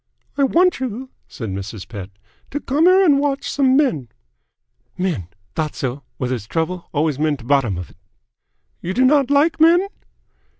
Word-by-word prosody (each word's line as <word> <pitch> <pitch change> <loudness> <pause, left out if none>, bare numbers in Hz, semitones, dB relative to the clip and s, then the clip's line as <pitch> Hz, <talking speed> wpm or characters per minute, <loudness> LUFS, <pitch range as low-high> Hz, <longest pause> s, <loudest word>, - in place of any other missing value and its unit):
"I 280 - +2
want 360 +6 +3
you," 260 +1 -5 0.2
said 115 -4 -6
Mrs. 100 +1 -6
Pett, 100 -4 -7 0.4
"to 290 - -3
come 295 +3 +1
here 380 +1 +6
and 285 -5 +5
watch 280 -1 -1
some 270 -2 +3
men 160 - +1 0.4
" - - -60 0.3
"Men! 175 - -2 0.3
Thought 155 -2 -2
so! 130 +1 -3 0.2
Wh' 125 - -1
there's 120 -5 -3
trouble, 170 +4 -3
always 150 -2 0
men't 150 -5 -1
bottom'f 120 -10 0
it!" - - -24 0.8
"You 185 +2 -4
do 255 +2 +4
not 280 0 +4
like 295 +4 +3
men?" 345 +4 +5
180 Hz, 165 wpm, -20 LUFS, -, 0.8 s, here